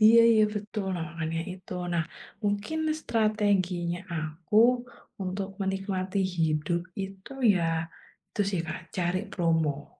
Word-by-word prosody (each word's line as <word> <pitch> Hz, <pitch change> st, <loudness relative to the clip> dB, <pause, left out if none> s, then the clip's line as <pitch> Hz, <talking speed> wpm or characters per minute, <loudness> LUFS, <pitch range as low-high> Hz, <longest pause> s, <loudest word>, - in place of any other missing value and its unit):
iya 230 Hz, +2 st, +9 dB
iya 215 Hz, -1 st, +6 dB
betul, 210 Hz, -1 st, -3 dB
nah 165 Hz, -, -2 dB
makanya 165 Hz, 0 st, -2 dB
itu. 185 Hz, 0 st, -10 dB, 0.2 s
Nah, 165 Hz, -1 st, +2 dB, 0.4 s
mungkin 205 Hz, +10 st, 0 dB, 0.2 s
strateginya 200 Hz, -, +1 dB
aku 155 Hz, +5 st, -2 dB, 0.7 s
untuk 190 Hz, +1 st, -2 dB
menikmati 195 Hz, 0 st, -1 dB, 0.2 s
hidup 160 Hz, +1 st, +1 dB, 0.2 s
itu 195 Hz, +5 st, -7 dB, 0.2 s
ya, 180 Hz, -3 st, +1 dB, 0.7 s
itu -, -, -2 dB
sih 185 Hz, -4 st, 0 dB
Kak 170 Hz, +2 st, -3 dB, 0.2 s
cari 180 Hz, +1 st, +1 dB
promo. 160 Hz, -5 st, +1 dB
185 Hz, 120 wpm, -28 LUFS, 165-205 Hz, 0.7 s, iya